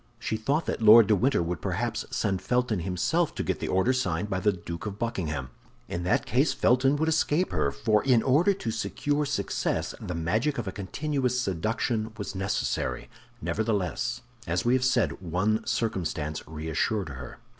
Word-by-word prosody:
She - - -2
thought 140 +9 0
that - - -3
Lord 110 +1 +9
de 105 +1 +4
Winter 120 -3 +2
would 85 +1 -3
perhaps - - -2
send 95 -3 -1
Felton 125 -1 0
himself 95 - 0
to - - -2
get - - -2
the - - -3
order 95 +8 +2
signed 105 -5 -1
by 95 - 0
the 105 +3 +3
Duke 85 +1 -6
of 100 -1 -5
Buckingham. 80 - -3 0.4
In 85 - -3
that 90 - +2
case 135 +5 +2
Felton 130 +4 +3
would 160 +2 0
escape 160 +2 +1
her—for 105 - +1
in 125 -4 +4
order 150 +9 +4
to 120 - -3
secure 145 +6 -1
success, 145 - -1
the 90 - -4
magic 110 - 0
of 115 -4 -3
a - - -2
continuous 125 +6 -1
seduction 110 +2 -1
was 100 -2 -5
necessary. 95 +1 -2 0.3
Nevertheless, 95 +1 -1 0.3
as 85 +5 0
we 120 - +3
have 130 -1 +2
said, 125 -6 +1
one 95 +5 0
circumstance 80 -8 -2
reassured 80 +5 -2
her. 65 -2 -8
110 Hz, 170 wpm, -27 LUFS, 90-125 Hz, 0.4 s, Lord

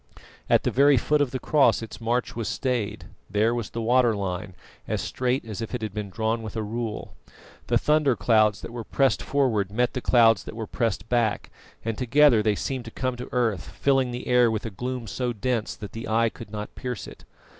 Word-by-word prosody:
At - - +4
the - - 0
very 140 +1 +5
foot 150 +5 +2
of 145 - +2
the 130 - -3
cross 140 -3 +3
its 115 - -9
march 120 +2 -1
was 115 -2 -3
stayed; 115 -5 -2 0.2
there 105 +4 +2
was 120 -4 -3
the 115 - -4
water 120 -1 +3
line, 95 -1 -4 0.3
as - - -1
straight 125 0 -1
as 110 -3 -6
if 115 +2 -4
it 120 - -4
had 105 -3 -4
been 105 -1 -4
drawn 110 +3 -1
with 110 -1 -7
a 110 - -1
rule. 110 0 -4 0.5
The - - +3
thunder 150 -4 +2
clouds 110 -5 +3
that - - -8
were 120 -1 -5
pressed 135 +4 +1
forward 120 -9 +1
met 120 +3 +1
the 125 - -3
clouds 115 -5 +4
that - - -8
were 110 -1 -4
pressed 110 -1 -2
back, 115 -3 0 0.3
and 115 -1 -2
together 130 -1 +5
they 105 -1 +2
seemed 130 +3 -3
to - - -6
come 130 +1 -2
to 125 - -7
earth, 115 -6 0
filling 135 -2 +1
the 125 +1 -5
air 125 -1 +4
with 110 0 -2
a 115 - -4
gloom 125 +4 -4
so 120 +4 -2
dense 115 0 -2
that 105 -2 -8
the 115 - -6
eye 115 +1 +2
could 115 -1 -11
not 105 0 -6
pierce 125 -5 -5
it. - - -12
115 Hz, 220 wpm, -25 LUFS, 110-125 Hz, 0.5 s, very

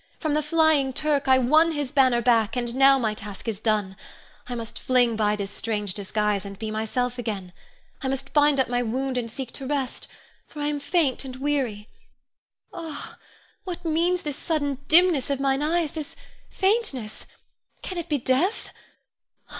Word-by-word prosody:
From 310 -2 -1
the 305 - +2
flying 300 -3 +3
Turk 290 -1 0
I 260 0 +6
won 310 +6 +4
his 290 -4 -3
banner 255 -4 +3
back, 225 -2 +3
and 240 -1 -2
now 270 +1 +6
my 220 -5 0
task 210 0 -8
is 215 -3 -2
done. 210 -3 0 0.5
I 245 - -4
must 230 -1 -7
fling 245 -3 +2
by 210 -1 +1
this 200 -1 -5
strange 210 -4 -3
disguise 210 0 -1
and 200 -1 -8
be 220 +1 -4
myself 245 +3 -2
again. 200 -6 -4 0.5
I 270 - -2
must 270 +1 -4
bind 295 -2 +4
up 265 - +3
my 245 0 0
wound 255 +3 -2
and 240 -2 -2
seek 250 +1 -6
to 270 - -7
rest, 275 -3 -2 0.4
for 300 - -11
I 290 0 0
am 295 -1 -2
faint 285 -3 +1
and 260 -1 -7
weary. 260 -7 -2 0.9
Ah, 320 -3 -8 0.4
what 355 -1 -6
means 340 +3 +1
this 295 -2 -3
sudden 285 -5 -1
dimness 330 -5 +5
of 280 -1 0
mine 275 0 +1
eyes, 320 0 +1
this 310 -3 -6 0.3
faintness 380 - -1 0.6
can 370 -2 -4
it 335 - -6
be 295 - +2
death? 275 - 0
265 Hz, 175 wpm, -25 LUFS, 225-300 Hz, 0.9 s, I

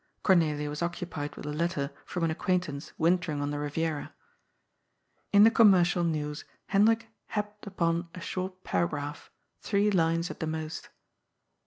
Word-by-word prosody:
Cornelia 155 -6 +3
was 150 +2 -5
occupied 170 -4 -3
with - - -8
a 150 - -3
letter 165 -2 -1 0.2
from 180 - -3
an 165 - +2
acquaintance 160 -4 -1
wintering 170 -2 +1
on 145 0 -1
the 145 - -3
Riviera. 150 +1 -2 1.2
In 205 0 +7
the 225 - +7
commercial 180 -6 +5
news 150 -2 -2 0.3
Hendrik 225 +3 +3 0.2
happed 210 0 -4
upon 170 -3 0
a - - -7
short 185 +1 -5
paragraph, 145 -3 -2 0.3
three 205 0 +1
lines 165 -1 +1
at - - -10
the 160 - -2
most. 160 0 -5
170 Hz, 145 wpm, -29 LUFS, 150-185 Hz, 1.2 s, In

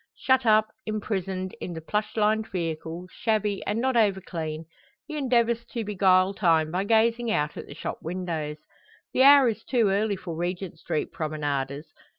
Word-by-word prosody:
Shut 260 -2 +2
up, 215 0 +5 0.2
imprisoned, 190 -3 -3
in 175 - -4
the 165 - -5
plush 210 +7 -3
lined 215 +1 +2
vehicle, 165 0 -4
shabby, 215 -3 -1
and 210 +2 0
not 260 +1 +1
over 205 -4 +3
clean, 160 -3 -5 0.4
he 310 - -7
endeavours 235 -4 +1
to 235 -2 -2
beguile 190 -2 +3
time 165 -5 +2
by 185 +3 -1
gazing 230 +2 +2
out 150 -8 0
at - - -8
the 145 - -10
shop - - -5
windows. 165 -3 -4 0.6
The - - +2
hour 280 -1 +8
is 225 -1 -2
too 235 -6 +2
early 200 +1 +1
for 180 -3 -7
Regent 175 0 -4
Street 155 - -2
promenaders. 145 -2 -3
195 Hz, 165 wpm, -26 LUFS, 165-220 Hz, 0.6 s, hour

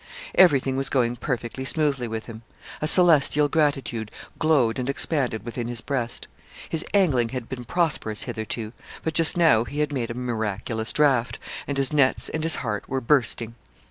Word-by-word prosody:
Everything 135 -7 +4
was 135 0 0
going 120 -3 +1
perfectly 120 0 -4
smoothly 140 -3 0
with 110 0 -5
him. 115 -1 -10 0.4
A 155 - 0
celestial 155 -4 +5
gratitude 140 -8 -1 0.3
glowed 135 -7 +2
and 125 +1 -3
expanded 135 -5 +1
within 120 0 -4
his 120 -1 -2
breast. 120 -1 -4 0.4
His 165 +1 -1
angling 145 - +2
had 125 -2 -6
been 125 -2 -7
prosperous 150 -9 -1
hitherto, 110 -1 -5 0.3
but 160 - -2
just 165 +1 +4
now 160 -10 +4
he 135 +4 -8
had 150 -1 -1
made 120 -4 -2
a 115 - -5
miraculous 110 -2 -3
draught, 135 -5 +2 0.3
and 140 - -3
his 135 +1 0
nets 140 -3 +2
and 160 - -3
his 165 0 +4
heart 105 -2 -4
were 135 - -1
bursting. 115 -3 +1
130 Hz, 170 wpm, -24 LUFS, 115-150 Hz, 0.4 s, celestial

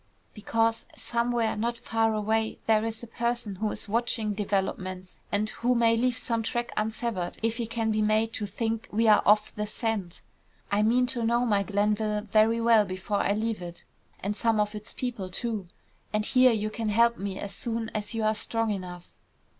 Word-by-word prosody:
"Because, 225 +1 0
somewhere, 235 -1 0
not 235 +3 -1
far 225 -1 +1
away, 220 +1 0
there 220 -1 +3
is 225 0 -4
a - - -7
person 235 -3 -2
who 215 +2 0
is - - -6
watching 225 -1 0
developments, 190 -2 -2
and 210 +1 +1
who 245 +1 +1
may 230 -1 +4
leave 245 0 +1
some 230 -2 -1
track 240 +2 -2
unsevered 215 -4 -2
if 230 0 +1
he 235 -2 -2
can 225 -1 -1
be 215 0 +1
made 215 +1 +2
to 210 - -3
think 225 +2 -3
we 225 +2 +2
are 210 -1 +7
off 210 +1 +4
the 210 0 -3
scent. 210 -5 -3 0.5
I 205 +1 +3
mean 240 +4 +4
to 245 -1 -2
know 235 +2 +2
my 205 -4 +2
Glenville 210 +1 0
very 220 +2 +3
well 230 -2 +5
before 190 +2 -3
I 200 - +2
leave 215 -1 -2
it, 175 -1 -8 0.4
and 205 +2 -1
some 225 +1 +1
of 210 0 +1
its 210 +1 -7
people 235 -7 -4
too. 215 -1 -3 0.4
And 215 0 0
here 255 +1 +5
you 215 -1 -1
can 225 -1 -2
help 235 +2 +3
me 195 -1 -3
as 200 0 -5
soon 230 -1 -3
as 215 +1 -3
you 225 - -1
are 215 0 +3
strong 225 +1 0
enough." 180 -3 -6
220 Hz, 195 wpm, -28 LUFS, 210-230 Hz, 0.5 s, are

